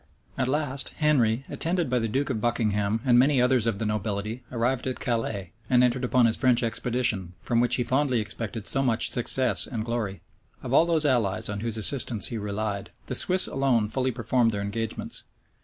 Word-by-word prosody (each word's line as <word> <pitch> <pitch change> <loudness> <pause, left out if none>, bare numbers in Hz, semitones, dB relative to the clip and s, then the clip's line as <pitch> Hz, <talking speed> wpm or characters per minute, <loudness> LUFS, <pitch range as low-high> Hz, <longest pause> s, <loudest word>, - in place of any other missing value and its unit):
At 130 -2 -1
last, 140 -1 -2
Henry, 135 -5 +1
attended 170 -1 -2
by 125 0 0
the 115 - -1
duke 135 +5 -1
of 110 -4 -3
Buckingham 110 -2 0
and 120 -2 +5
many 135 +1 +3
others 125 -2 +2
of 110 -4 -1
the 110 - -3
nobility, 105 +2 -3
arrived 125 +2 -1
at 130 - -4
Calais, 110 -7 -3 0.2
and 125 -1 +4
entered 125 +1 +1
upon 125 0 +3
his 115 - +1
French 125 -2 +2
expedition, 115 -6 -1
from 115 - 0
which 120 - +4
he 125 - 0
fondly 130 -1 0
expected 110 0 -5
so 135 - +1
much 120 -4 +1
success 125 -3 +3
and 110 -3 -4
glory.[*] 110 -6 -4 0.4
Of 125 - -5
all 160 - +5
those 160 -3 +1
allies 115 -11 0
on 100 -1 -4
whose 115 +1 -3
assistance 115 -2 +4
he 115 - -4
relied, 105 -1 -4 0.2
the - - -5
Swiss 185 +1 +4
alone 125 -6 0
fully 130 +3 0
performed 120 0 0
their 100 - -3
engagements. 110 +2 -4
120 Hz, 190 wpm, -25 LUFS, 110-130 Hz, 0.4 s, and